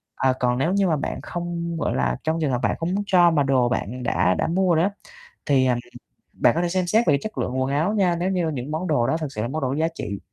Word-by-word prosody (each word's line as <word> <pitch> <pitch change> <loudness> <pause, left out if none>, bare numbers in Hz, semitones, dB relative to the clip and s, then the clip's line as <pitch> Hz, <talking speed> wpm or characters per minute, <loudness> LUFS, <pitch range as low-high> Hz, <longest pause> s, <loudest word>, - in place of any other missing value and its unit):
À, 130 -1 +2
còn 125 0 +1
nếu 165 +8 +1
như 200 -1 +2
mà 160 - +2
bạn 140 - -4
không, 170 -1 -4
gọi 145 - -1
là, 65 -1 0
trong 160 +1 0
trường 145 -4 +1
hợp 120 - 0
bạn - - +1
không 175 +3 -1
muốn 205 - -1
cho 175 -3 +5
mà 145 -3 +2
đồ 130 -3 +2
bạn 125 +1 -3
đã 90 -5 +2
đã - - 0
mua 180 0 +2
rồi 160 - +3
á, 200 - 0 0.5
thì, 135 -2 +3
à, 125 - +3
ừm, 120 - -2 0.6
bạn - - +5
có 170 - +1
thể 175 - 0
xem 185 0 -1
xét 225 +5 +2
về - - +5
cái 140 - +2
chất 215 - -6
lượng 130 +1 -1
quần 135 +1 -1
áo 160 +9 +1
nha. 185 -5 +2
Nếu 180 +3 -1
như 175 -4 0
những 140 0 -5
món 165 +4 -2
đồ 130 -6 +1
đó 160 - +1
thực 155 -4 -5
sự 105 - -3
là 115 - -1
món 155 +4 -4
đồ 130 - 0
có 135 - -1
giá 160 +2 +1
trị, 100 -9 -5
155 Hz, 310 wpm, -23 LUFS, 130-175 Hz, 0.6 s, cho